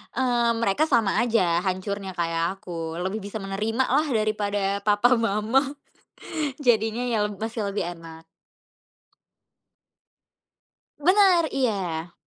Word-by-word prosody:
eee, 240 -2 +2
mereka 230 +5 +1
sama 215 -4 +2
aja 185 -8 +2
hancurnya 190 +1 -3
kayak 170 +2 -1
aku 165 -4 -6
lebih 190 +4 -2
bisa 205 +2 -5
menerima 210 +5 -1
lah 295 +5 +2
daripada 205 -3 0
papa 215 +5 +4
mama 225 +2 +2 1.0
jadinya 225 -3 +2
ya 220 -3 +1
masih 215 +1 -4
lebih 195 -3 -2
enak. 165 -1 -12 2.7
Bener 365 +2 +5
iya. 185 -10 -2
210 Hz, 105 wpm, -25 LUFS, 190-235 Hz, 2.7 s, Bener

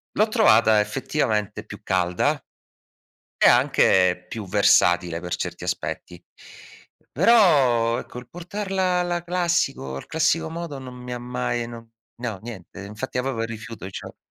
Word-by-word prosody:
L'ho 215 +3 +3
trovata 110 - +4
effettivamente 105 -2 -2
più 105 -1 -10
calda, 90 -3 +1 1.0
e - - +5
anche 90 -1 +3
più 110 -3 -6
versatile 85 -1 +3
per 90 0 -3
certi - - -5
aspetti. 90 -1 -4 0.9
Però, 140 - +4
ecco, - - -10
il 125 0 -11
portarla 185 +1 -2
alla 175 -1 -1
classico 175 - -1
al 70 - -7
classico 160 0 +1
modo, 165 -4 -6
non 130 -1 -9
mi 125 0 -8
ha 120 - -3
mai 120 -1 -3
no 115 -1 -11 0.3
no, 115 -5 -5
niente. 100 -4 -9
Infatti 105 +6 -5
avevo 125 -3 -2
rifiuto 115 -3 -7
cio - - -9
120 Hz, 135 wpm, -23 LUFS, 105-160 Hz, 1.0 s, e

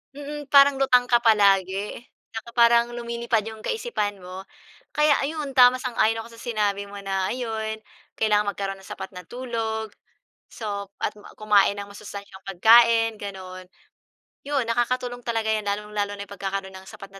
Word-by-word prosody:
Mm, 290 0 -7
parang 280 -1 +6
lutang 250 -2 +4
ka 240 - +5
palagi. 200 -3 +2 0.3
Tsaka 225 +1 -7
parang 235 0 +4
lumilipad 235 -1 -1
yung 220 0 -8
kaisipan 210 - -2
mo. 185 +1 -8 0.5
Kaya 300 -1 +4
ayon, 300 -1 -3
tama, 250 0 +8
sang-ayon 225 -3 +1
ako 235 - -14
sa - - -13
sinabi 205 -4 -1
mo 205 - -11
na 195 -1 -1
ayun, 220 -2 -4 0.3
kailangang 210 -1 +2
magkaroon 195 -1 -4
nang 190 - -15
sapat - - -7
na 180 0 -9
tulog, 225 -3 -4 0.6
so 200 -3 -5
at - - -1
ma 205 - -14
kumain 210 -2 +4
ng 200 0 -6
masustansiyang 200 -1 -10
pagkain, 225 +3 +5
gano'n. 185 -2 -8 0.8
Yun, 285 -3 +1
nakakatulong 245 +1 -1
talaga 225 -2 -1
'yan, 215 -1 -1
lalong-lalo 205 0 -2
na 200 - -5
yung - - -23
pagkakaroon 195 -1 -4
ng 190 0 -12
sapat 195 - -11
na 195 - -12
220 Hz, 160 wpm, -24 LUFS, 200-240 Hz, 0.8 s, tama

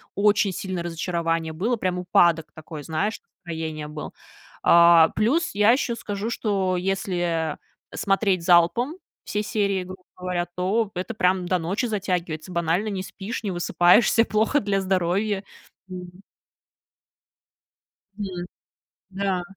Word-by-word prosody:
очень 205 -1 +3
сильное 185 -2 -4
разочарование 165 -1 -2
было, 210 +10 0
прям 185 -4 -2
упадок 170 -2 +3
такой, 155 -1 -9
знаешь, 160 +9 -2 0.3
настроения 160 -2 -4
был. 150 0 -7 0.5
А, 170 -1 +7
плюс, 270 +11 +1
я 210 +2 +5
еще 245 -1 +1
скажу, 210 -1 -4
что 195 -5 0
если, 175 -4 -1 0.3
э, - - -9
смотреть 195 -2 +1
залпом 185 - +4 0.3
все 210 0 -2
серии, 200 -4 0
грубо 185 +1 -10 0.2
говоря, 180 -1 -2
то 195 +4 0
это 185 +5 -4
прям 185 -3 +1
до 185 - +2
ночи 185 +9 -1
затягивается. 180 -6 -3
Банально 170 +4 0
не 190 -2 -3
спишь, 205 +5 -6
не 200 - -2
высыпаешься, 180 +6 +4
плохо 220 +8 +2
для 200 -3 0
здоровья. 190 +2 0 0.4
Мгм. 180 0 -9 2.0
Мгм. 185 -4 -5 0.6
Да. 195 -1 -1
185 Hz, 125 wpm, -24 LUFS, 170-205 Hz, 2.0 s, А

